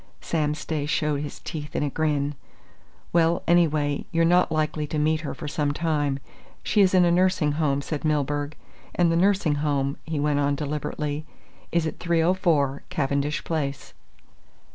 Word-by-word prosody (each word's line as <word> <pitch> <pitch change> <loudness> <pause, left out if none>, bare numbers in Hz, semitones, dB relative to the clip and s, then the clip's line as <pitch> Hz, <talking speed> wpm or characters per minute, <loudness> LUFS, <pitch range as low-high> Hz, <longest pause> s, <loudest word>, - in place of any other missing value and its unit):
Sam 150 -2 -1
Stay 155 -1 -3
showed 150 -1 0
his 145 -2 -6
teeth 150 -3 -6
in - - +1
a 145 - 0
grin. 150 -2 0 0.8
"Well, 170 0 +3
anyway, 155 -4 +2
you're 165 -1 +3
not 175 0 +4
likely 155 -1 -1
to 155 - -3
meet 155 +1 +1
her 155 - -5
for 155 - -7
some 145 -1 -1
time. 145 -3 0 0.5
She 210 - +3
is 190 -1 +4
in 180 -1 +6
a 170 - +3
nursing 180 -4 +2
home," 145 -2 0
said 150 -1 -4
Milburgh, 145 0 0 0.4
"and 175 -1 +3
the - - +2
nursing 180 -4 +2
home," 140 -2 0
he 160 -2 -3
went 145 0 +1
on 140 0 +1
deliberately, 150 +1 -3 0.4
"is 170 -1 +1
at 160 - -4
304, 165 -5 +2
Cavendish 145 -3 -1
Place." 145 -4 -3
150 Hz, 165 wpm, -25 LUFS, 145-165 Hz, 0.8 s, in